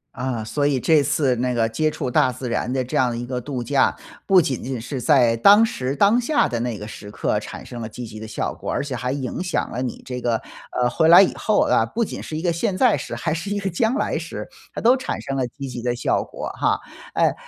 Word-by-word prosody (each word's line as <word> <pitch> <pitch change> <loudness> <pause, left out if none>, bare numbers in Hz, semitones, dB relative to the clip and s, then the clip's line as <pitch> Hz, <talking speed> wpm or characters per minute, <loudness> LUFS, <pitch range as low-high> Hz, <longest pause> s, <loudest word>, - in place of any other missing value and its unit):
啊， 125 -4 -3
所 145 +6 0
以 140 - +1
这 155 +3 +4
次 140 -2 +1
那 125 +1 0
个 115 -2 +1
接 155 +7 +1
触 130 -4 -4
大 130 - +3
自 125 0 -5
然 125 - -1
的 130 0 0
这 125 - -3
样 125 0 +3
的 115 - -3
一 120 - -4
个 125 0 -3
度 125 -1 -4
假， 135 +2 +2 0.3
不 190 -3 +6
仅 130 -5 -2
仅 130 -1 -4
是 130 +2 -5
在 120 -4 +4
当 205 - +7
时 130 - -3
当 200 - +4
下 290 +5 +2
的 120 - -2
那 120 -2 -2
个 105 - -7
时 105 -1 -9
刻 - - -1
产 - - -9
生 120 -1 -8
了 110 - -4
积 120 +2 -7
极 110 -1 -9
的 110 - -7
效 110 - -3
果， - - -7
而 - - -1
且 140 -2 -5
还 125 +1 -2
影 135 +3 -4
响 185 -2 -2
了 125 - -3
你 125 -3 -4
这 125 -1 -4
个， 120 -2 0 0.4
呃， 125 - +3
回 160 - +2
来 175 +3 +10
以 195 - +3
后 215 -1 +2
啊， 115 - +3
不 230 - -1
仅 - - -5
是 155 - -6
一 160 - -3
个 175 - +1
现 185 +4 -1
在 245 -2 +4
时， - - -6
还 160 -2 -1
是 175 +5 -4
一 - - -1
个 195 -1 -2
将 220 +7 +1
来 - - 0
时， - - -6 0.3
它 - - -5
都 245 +3 +5
产 - - -4
生 135 -1 -4
了 125 -2 0
积 135 +2 -8
极 125 -1 -6
的 120 0 -1
效 - - +1
果 - - -6
哈。 - - +2 0.3
哎 - - +3
130 Hz, 290 characters per minute, -22 LUFS, 120-165 Hz, 0.4 s, 来